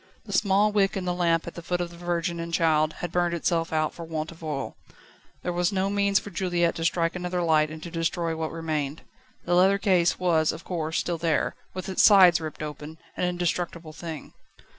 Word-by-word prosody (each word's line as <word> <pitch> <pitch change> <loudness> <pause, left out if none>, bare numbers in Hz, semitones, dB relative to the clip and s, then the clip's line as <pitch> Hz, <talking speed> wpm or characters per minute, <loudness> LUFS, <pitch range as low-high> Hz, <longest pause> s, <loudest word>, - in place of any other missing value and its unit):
The - - -7
small 205 +1 +3
wick 200 -2 +2
in 185 - -3
the 180 - 0
lamp 170 -2 +1
at 170 - -7
the 170 - -8
foot 175 +1 -2
of 175 -1 -3
the - - -12
Virgin 170 0 -2
and 170 0 -5
Child 155 -2 +2
had 175 - -3
burned 175 -1 +1
itself 165 0 0
out 155 -1 0
for 170 - -8
want 160 -1 -4
of 165 0 -14
oil; 145 -4 -4 0.7
there 180 - -2
was 175 0 +1
no 195 0 0
means 200 0 +2
for 205 - -3
Juliette 175 -1 +1
to 165 - -3
strike 165 0 +1
another 180 0 -2
light 155 -2 +3
and 155 0 -9
to 170 - -7
destroy 165 0 -1
what 160 0 -3
remained. 155 -3 -3 0.4
The 175 - 0
leather 190 +3 +5
case 180 -4 +2
was, 165 -4 +2
of 165 - -9
course, 160 -3 -3
still 170 -2 -1
there, 165 -2 +1 0.2
with 185 - -5
its 190 - +1
sides 185 -5 +7
ripped 155 0 -6
open, 150 +1 -7 0.2
an - - 0
indestructible 175 -2 -2
thing. 160 -2 -8
170 Hz, 215 wpm, -26 LUFS, 160-180 Hz, 0.7 s, sides